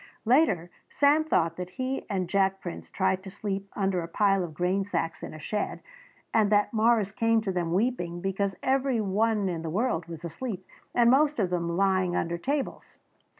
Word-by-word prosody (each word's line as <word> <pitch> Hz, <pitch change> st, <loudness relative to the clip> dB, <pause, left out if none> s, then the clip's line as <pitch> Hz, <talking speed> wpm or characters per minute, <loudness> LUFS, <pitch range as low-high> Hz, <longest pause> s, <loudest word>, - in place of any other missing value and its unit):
Later 215 Hz, -, +3 dB, 0.2 s
Sam 290 Hz, +2 st, +4 dB
thought 165 Hz, -, +1 dB
that 180 Hz, 0 st, -5 dB
he 260 Hz, +7 st, -4 dB
and 190 Hz, -3 st, -1 dB
Jack 195 Hz, +1 st, +1 dB
Prince 175 Hz, -2 st, -7 dB
tried 190 Hz, -1 st, 0 dB
to 190 Hz, -, -9 dB
sleep 195 Hz, 0 st, -4 dB
under 195 Hz, -3 st, 0 dB
a 165 Hz, -, -5 dB
pile 195 Hz, +2 st, +2 dB
of 160 Hz, -3 st, -7 dB
grain 180 Hz, +4 st, +1 dB
sacks 165 Hz, -4 st, -3 dB
in -, -, -6 dB
a -, -, -9 dB
shed 210 Hz, +7 st, -3 dB, 0.5 s
and 215 Hz, -2 st, +3 dB
that 205 Hz, +2 st, +3 dB
Morris 220 Hz, -2 st, +3 dB
came 225 Hz, +1 st, +2 dB
to 205 Hz, -3 st, -2 dB
them 175 Hz, -2 st, -1 dB
weeping 180 Hz, -4 st, 0 dB
because 195 Hz, +1 st, -1 dB
every 265 Hz, -2 st, +1 dB
one 210 Hz, 0 st, +1 dB
in 170 Hz, -3 st, -2 dB
the 165 Hz, -, -4 dB
world 185 Hz, -2 st, -1 dB
was 170 Hz, 0 st, -8 dB
asleep 190 Hz, +2 st, -5 dB, 0.3 s
and 235 Hz, -1 st, +5 dB
most 295 Hz, +3 st, +3 dB
of 190 Hz, -5 st, 0 dB
them 170 Hz, -1 st, -1 dB
lying 185 Hz, -2 st, +2 dB
under 170 Hz, +1 st, -1 dB
tables. 280 Hz, +6 st, -3 dB
195 Hz, 190 wpm, -27 LUFS, 175-225 Hz, 0.5 s, and